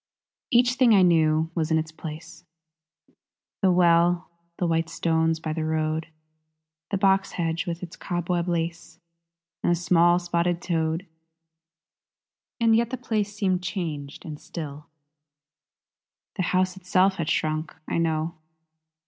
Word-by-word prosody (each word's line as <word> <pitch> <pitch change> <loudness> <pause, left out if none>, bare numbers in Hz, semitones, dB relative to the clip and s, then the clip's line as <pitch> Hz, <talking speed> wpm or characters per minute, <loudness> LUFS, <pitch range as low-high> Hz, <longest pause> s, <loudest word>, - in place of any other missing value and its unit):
Each 245 +1 +4
thing 250 -4 +5
I 190 - +6
knew 160 -2 +3
was 165 -2 -1
in 160 - +3
its 160 0 -2
place; 160 +2 -9 1.2
The 190 - +4
well, 175 0 +3 0.3
the 180 - 0
white 165 -1 0
stones 160 -1 +1
by 155 -1 -3
the 160 0 -2
road, 155 0 -1 0.8
The 200 - 0
box 195 0 +2
hedge 165 +1 -2
with 170 +1 -4
its 175 - -8
cobweb 175 0 -2
lace, 165 -1 -3 0.6
And - - +2
a - - +4
small 175 0 +4
spotted 175 0 0
toad. 165 0 -1 1.5
And 230 -1 +4
yet 235 0 +2
the 260 - -3
place 215 -4 -2
seemed 190 -4 0
changed 155 -7 -5
and 150 -2 -7
still; 150 -3 -7 1.5
The 190 - -3
house 185 0 +1
itself 190 +1 +2
had 165 -2 -2
shrunk, 155 +1 -1
I - - -1
know. 160 0 0
170 Hz, 135 wpm, -25 LUFS, 160-185 Hz, 1.5 s, I